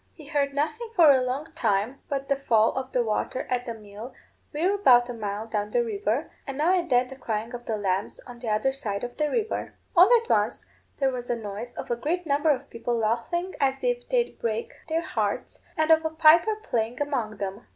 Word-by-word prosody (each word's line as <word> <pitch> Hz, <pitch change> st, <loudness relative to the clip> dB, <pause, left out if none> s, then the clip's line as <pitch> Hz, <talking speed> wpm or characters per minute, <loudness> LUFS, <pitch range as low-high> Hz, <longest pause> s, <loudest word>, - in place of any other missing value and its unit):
He 310 Hz, -, -13 dB
heard 280 Hz, -1 st, -1 dB
nothing 315 Hz, +11 st, -2 dB
for 325 Hz, -5 st, +8 dB
a 260 Hz, -2 st, +4 dB
long 270 Hz, +6 st, -3 dB
time 225 Hz, -2 st, 0 dB
but 275 Hz, -1 st, -2 dB
the 275 Hz, -, +2 dB
fall 230 Hz, -5 st, +3 dB
of 265 Hz, 0 st, -4 dB
the 245 Hz, -, +2 dB
water 225 Hz, +3 st, -2 dB
at 250 Hz, 0 st, -1 dB
the 230 Hz, -, -4 dB
mill 215 Hz, +3 st, -10 dB, 0.4 s
weir 340 Hz, +6 st, +1 dB
about 250 Hz, -12 st, +5 dB
a -, -, -3 dB
mile 210 Hz, -1 st, -4 dB
down 210 Hz, -2 st, -2 dB
the 240 Hz, +2 st, +2 dB
river, 220 Hz, +5 st, -2 dB, 0.2 s
and 275 Hz, -1 st, -5 dB
now 325 Hz, +5 st, +3 dB
and 355 Hz, -2 st, 0 dB
then 250 Hz, -1 st, +3 dB
the 265 Hz, -, -8 dB
crying 225 Hz, -2 st, -4 dB
of 240 Hz, 0 st, -7 dB
the 220 Hz, -, -1 dB
lambs 195 Hz, -1 st, -2 dB
on 245 Hz, -1 st, -11 dB
the 235 Hz, -2 st, -4 dB
other 215 Hz, +5 st, +1 dB
side 215 Hz, -7 st, -4 dB
of 245 Hz, 0 st, -6 dB
the 300 Hz, -1 st, +1 dB
river. 445 Hz, +2 st, -2 dB, 0.2 s
All 360 Hz, +3 st, +8 dB
at -, -, -15 dB
once -, -, +1 dB, 0.3 s
there 270 Hz, -1 st, +2 dB
was 245 Hz, -1 st, -5 dB
a 240 Hz, -, +1 dB
noise 220 Hz, +2 st, -7 dB
of -, -, -6 dB
a -, -, +2 dB
great 340 Hz, +9 st, -2 dB
number 290 Hz, +1 st, +2 dB
of 275 Hz, -1 st, 0 dB
people 235 Hz, +1 st, -2 dB
laughing 240 Hz, +12 st, -1 dB
as 270 Hz, -, 0 dB
if -, -, -1 dB
they'd 485 Hz, -1 st, 0 dB
break 225 Hz, 0 st, -2 dB, 0.2 s
their 325 Hz, +1 st, 0 dB
hearts, -, -, -2 dB, 0.2 s
and 315 Hz, +1 st, +3 dB
of 320 Hz, 0 st, +6 dB
a 320 Hz, -, 0 dB
piper 325 Hz, +6 st, +5 dB
playing 240 Hz, -, -2 dB
among 260 Hz, -7 st, -2 dB
them. 200 Hz, +2 st, -5 dB
255 Hz, 225 wpm, -26 LUFS, 225-310 Hz, 0.4 s, for